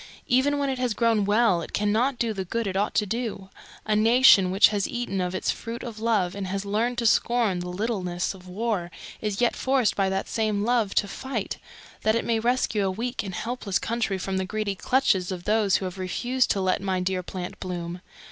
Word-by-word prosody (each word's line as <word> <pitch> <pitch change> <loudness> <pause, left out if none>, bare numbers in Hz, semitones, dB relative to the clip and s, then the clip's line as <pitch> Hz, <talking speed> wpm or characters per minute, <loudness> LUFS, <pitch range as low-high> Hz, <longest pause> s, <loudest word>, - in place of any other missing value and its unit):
Even 270 +4 +2
when 285 -1 0
it 260 - -4
has 245 -4 0
grown 225 -3 +2
well 205 -3 +3
it - - -8
cannot 220 +6 +1
do 230 -2 0
the 195 -2 -3
good 230 +5 -2
it 190 -1 -3
ought 205 +2 0
to 210 - +2
do: 220 -3 -4 0.4
a 215 - +1
nation 225 -3 +6
which 190 +2 +6
has 205 -2 -1
eaten 240 -6 -2
of 180 0 -2
its - - 0
Fruit 230 +1 -6
of 230 -3 -7
Love 215 -6 +1
and 200 -1 -4
has 195 +1 -3
learned 225 +5 0
to 235 - -1
scorn 225 -4 +2
the 175 0 -5
littleness 180 -3 -2
of 185 -1 -14
war 195 -2 -2 0.3
is 210 0 -2
yet 240 - +2
forced 260 -4 +1
by 195 -1 +1
that 190 0 -2
same 215 -2 0
Love 230 -3 +1
to 205 - +2
fight, 250 -1 -4 0.4
that 220 0 +2
it 230 - -1
may 230 -1 +1
rescue 230 -4 +1
a - - +1
weak 235 +6 -3
and 190 -2 -6
helpless 225 -5 -2
country 225 -4 -1
from 190 +1 -3
the 190 - -1
greedy 215 +1 -2
clutches 195 -3 +1
of 180 -2 -5
those 210 -1 +2
who 190 - 0
have 185 +1 -6
refused 245 +7 0
to 195 - +1
let 185 0 +1
my 190 -1 -1
dear 185 0 -1
plant 180 0 -7
bloom. 175 -1 -5
210 Hz, 220 wpm, -25 LUFS, 190-235 Hz, 0.4 s, nation